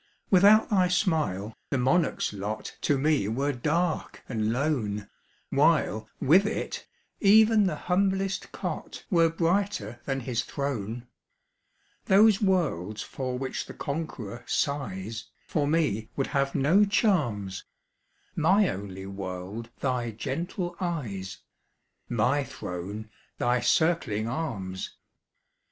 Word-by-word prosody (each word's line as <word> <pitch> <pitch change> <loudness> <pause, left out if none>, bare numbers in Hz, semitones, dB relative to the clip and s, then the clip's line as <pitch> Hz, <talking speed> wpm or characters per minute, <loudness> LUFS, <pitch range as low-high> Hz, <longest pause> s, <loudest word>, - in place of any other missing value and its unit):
Without 205 +4 +6
thy 185 -3 +4
smile, 155 - 0 0.2
the 140 - 0
monarch's 135 0 +1
lot 105 +2 -5
To 145 - +2
me 145 -6 +2
were 135 +7 0
dark 155 +6 -1
and 110 -3 -1
lone, 115 -7 -1 0.4
While, 110 +1 +2
with 185 +9 +5
it, - - -4 0.3
even 215 0 +6
the 165 - -1
humblest 195 +3 0
cot - - -5
Were 165 -2 +5
brighter 170 - -1
than 135 -1 -1
his 120 -1 -1
throne. 120 -4 -4 1.0
Those 210 +2 +5
worlds 135 - 0
for 130 -2 -4
which 130 0 -4
the - - -9
conqueror 140 -7 -5
sighs 110 -6 -2 0.2
For 145 -3 0
me 145 -9 +1
would 135 - 0
have 140 0 +1
no 165 +10 +5
charms; 140 - +1 0.7
My 190 +5 +4
only 95 -1 -6
world 95 +3 -6
thy 125 -3 0
gentle 170 - -4
eyes 110 - -4 0.7
My 125 +5 +2
throne 100 0 -6 0.3
thy 125 +1 +2
circling 120 -8 +1
arms! 115 -10 -4
135 Hz, 110 wpm, -27 LUFS, 110-175 Hz, 1.0 s, Without